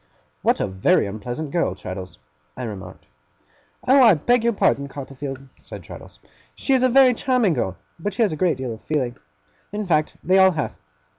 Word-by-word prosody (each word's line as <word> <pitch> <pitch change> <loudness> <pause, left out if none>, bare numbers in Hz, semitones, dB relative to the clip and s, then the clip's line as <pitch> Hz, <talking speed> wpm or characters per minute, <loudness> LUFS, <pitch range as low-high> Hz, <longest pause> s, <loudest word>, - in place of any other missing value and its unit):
'What - - +2
a - - +1
very 95 +2 +2
unpleasant 120 +9 -5
girl, 170 - 0
Traddles!' 95 0 -8 0.4
I - - -5
remarked. 95 -5 -8 0.8
'Oh, 270 +2 +6
I 225 -7 +7
beg 240 +10 +2
your 235 - +3
pardon, 140 -9 +1
Copperfield!' 135 -1 -7
said - - -10
Traddles. - - -12 0.4
'She 270 - 0
is 260 - +4
a 255 - +4
very 260 0 +6
charming 245 -6 +1
girl, 95 -9 -2 0.2
but 200 +3 -3
she 230 - +2
has 210 - +1
a - - -2
great 165 -2 +1
deal 130 -3 -4
of 110 - -11
feeling. 130 -6 -2 0.6
In 210 0 -3
fact, 155 -4 0
they 185 +2 +4
all 190 -1 +6
have. 150 -2 -3
155 Hz, 190 wpm, -22 LUFS, -, 0.8 s, I